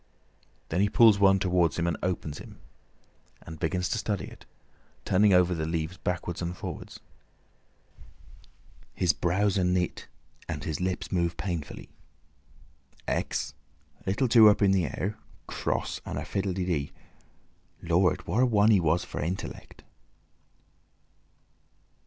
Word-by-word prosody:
Then 85 +4 0
he 100 - +3
pulls 110 -2 +6
one 95 -1 +5
towards 90 -3 +1
him 85 - 0
and 85 -2 0
opens 85 -5 -3
it, - - -10 0.9
and 80 -1 -10
begins 90 +3 -1
to 115 - -1
study 105 -2 -2
it—turning 100 +2 -2
over 90 -1 +4
the 80 -2 -2
leaves 80 +1 -3
backwards 90 0 -3
and 85 +1 -4
forwards. - - -7 1.9
His 90 -4 +2
brows 95 +4 +1
are - - +1
knit 90 -1 -1 0.4
and 75 -3 -4
his 80 +2 -3
lips 90 0 -2
move 85 -2 0
painfully. 85 -3 -5 1.2
"Hex, 70 -1 -2 0.5
little 105 +8 +1
two 115 -2 +8
up 105 - +3
in 100 - +5
the 95 -3 +2
air, 95 +8 -4 0.3
cross - - -3
and - - -5
a - - -4
fiddle 95 -1 -2
de 90 0 -2
dee. 75 -6 -1 0.9
Lord! 85 -1 +2
what 115 - +1
a - - +5
one 105 -1 +4
he 100 - +5
was 85 +1 +1
for - - -6
intellect!" 85 +5 -6
90 Hz, 135 wpm, -28 LUFS, 85-100 Hz, 1.9 s, two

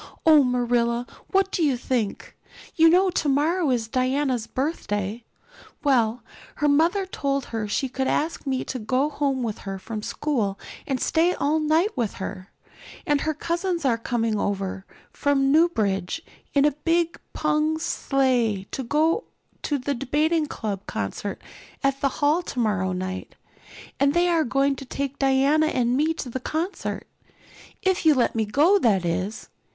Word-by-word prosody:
"Oh, 310 -3 +7
Marilla, 240 -1 +1 0.2
what 390 0 +1
do - - -1
you 275 -5 +2
think? 240 -4 -3 0.4
You 325 0 +6
know 370 +2 +4
tomorrow 310 +3 +1
is 235 -3 0
Diana's 255 -1 0
birthday. 225 - -3 0.6
Well, 240 -5 +2 0.3
her 295 - +1
mother 335 +7 +3
told 275 -7 -2
her 220 -2 -2
she 265 +6 -1
could 265 +1 -2
ask 310 -1 -1
me 260 -1 0
to 255 - -5
go 255 +7 0
home 275 -3 -1
with 220 -3 -3
her 195 -1 -5
from 215 +3 -6
school 215 -6 -1 0.3
and 265 -2 -1
stay 335 +6 +2
all 300 +3 +1
night 315 +7 +2
with 235 -5 -2
her. 190 0 -6 0.6
And 290 -1 +2
her 315 -1 -1
cousins 340 +1 -2
are 235 -3 +2
coming 230 -2 -1
over 195 -1 -3 0.2
from 275 -1 +1
Newbridge 225 - +1 0.3
in 280 0 +5
a 295 - +4
big 335 +3 0
pung 305 +1 +1
sleigh 255 -9 +1
to - - -3
go 315 - +1 0.4
to 290 - -1
the 280 +2 -2
Debating 300 +5 +1
Club 205 -7 -5
concert - - -4 0.4
at 275 0 +1
the 275 - +3
hall 295 +5 +1
tomorrow 210 - -1
night. 185 +1 -5 0.6
And 280 +2 +3
they 350 +1 +3
are 330 -2 +2
going 275 +2 +1
to 270 - -8
take 275 +2 -4
Diana 275 +3 +3
and 245 -4 +1
me 310 +4 +1
to 260 - -5
the 260 - -3
concert 325 +9 -3 0.8
if 380 -1 +1
you'll 310 -4 +5
let 245 - +2
me 225 -1 0
go, 305 - +4
that 200 - +2
is. 185 +5 -2
275 Hz, 155 wpm, -24 LUFS, 230-310 Hz, 0.8 s, Oh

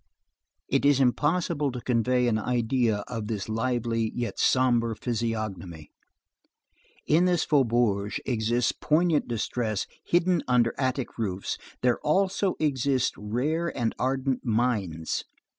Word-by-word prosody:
It - - +1
is 140 -1 +4
impossible 150 +3 +1
to 125 - -5
convey 125 +1 +1
an 110 -2 +1
idea 115 -2 0
of 115 -4 -5
this 105 -3 -3
lively 115 0 -1
yet 120 -1 -3
sombre 120 -3 +2
physiognomy. 110 - -4 1.1
In 165 +4 +3
this 175 -2 +2
faubourg 115 -7 +2
exists 120 0 +1
poignant 160 0 +1
distress 110 -2 -2 0.2
hidden 175 -1 +2
under 120 -2 +3
attic 130 -2 -2
roofs; 100 -4 -3 0.2
there 125 -1 +2
also 190 +4 +1
exist 135 -3 +1
rare 135 +11 -1
and 115 -2 0
ardent 130 0 -1
minds. 105 -9 -1
120 Hz, 115 wpm, -27 LUFS, 110-140 Hz, 1.1 s, is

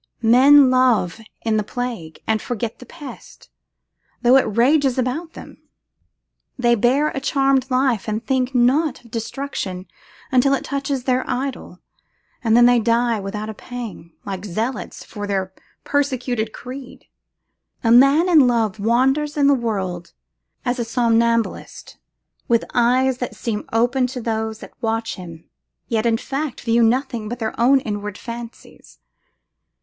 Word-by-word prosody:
Men 260 +4 +7
love 245 -8 +2 0.3
in 220 -1 +2
the 210 - 0
plague, 225 -9 -6
and 220 -1 0
forget 235 -2 -4
the 250 - -12
pest, 295 -2 -12 0.7
though 245 +2 +6
it 240 -5 +2
rages 270 +1 +3
about 270 +7 -2
them. - - -12 1.0
They 240 -2 +3
bear 255 +7 +2
a - - -4
charmed 270 -1 +1
life, 255 -5 +1
and 215 +2 -3
think 260 -1 0
not 260 +3 +2
of 235 - -17
destruction 225 -6 -4 0.5
until 275 +2 +4
it - - -5
touches 275 -2 -3
their 255 0 +1
idol, 255 -7 -4 0.6
and 225 -1 +4
then 240 - +7
they 245 0 +5
die 230 0 +1
without 210 +2 -5
a 220 - -5
pang, 220 -7 -8
like 195 -1 -5
zealots 215 +5 -4
for 205 -2 -7
their 190 -1 -2 0.3
persecuted 255 -6 -1
creed. 255 +2 -10 0.8
A 225 - +3
man 275 +8 +6
in 310 -7 +6
love 225 -4 0
wanders 265 +7 +1
in 285 - +3
the 280 - +6
world 190 -8 -3 0.5
as 245 0 -1
a - - 0
somnambulist, 230 -1 0 0.5
with 235 -1 +2
eyes 250 +2 +2
that 245 - -4
seem 215 -3 -4
open 245 +3 +2
to 250 0 -6
those 220 -1 -3
that - - -11
watch 225 0 -1
him, 170 -3 -11 0.4
yet 230 0 +1
in 225 -1 +2
fact 275 +2 -4
view 230 0 +2
nothing 235 -2 0
but 240 - -4
their 220 -2 -3
own 270 +3 +5
inward 205 -3 -5
fancies. 235 0 -10
240 Hz, 145 wpm, -21 LUFS, 220-265 Hz, 1.0 s, Men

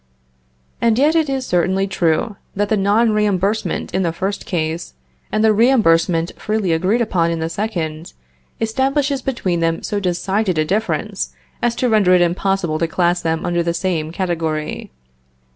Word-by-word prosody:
And 230 -1 +3
yet 295 +4 +4
it 320 -3 +2
is 265 -1 -2
certainly 190 +1 +1
true, 190 +2 0 0.2
that 205 +1 0
the 220 - +3
non 210 +3 +3
reimbursement 210 0 0
in 190 - +1
the 170 -3 0
first 195 +4 -4
case, 160 - -3 0.4
and 215 - +1
the 220 -1 +5
reimbursement 180 -8 +3
freely 210 -4 -1
agreed 185 +9 +1
upon 175 -7 +1
in 165 - -1
the 160 0 -2
second, 165 -5 -4 0.5
establishes 270 +4 0
between 190 -10 -1
them 165 0 0
so 205 - -2
decided 190 +1 0
a 155 - +2
difference, 210 +7 -2 0.3
as 240 -1 +1
to 255 - 0
render 205 -5 +4
it 180 - +4
impossible 175 -2 0
to 165 - +1
class 175 +1 +1
them 160 0 -1
under 175 0 +1
the 170 0 -1
same 165 -5 -1
category. 165 -4 -3
190 Hz, 160 wpm, -19 LUFS, 170-220 Hz, 0.5 s, the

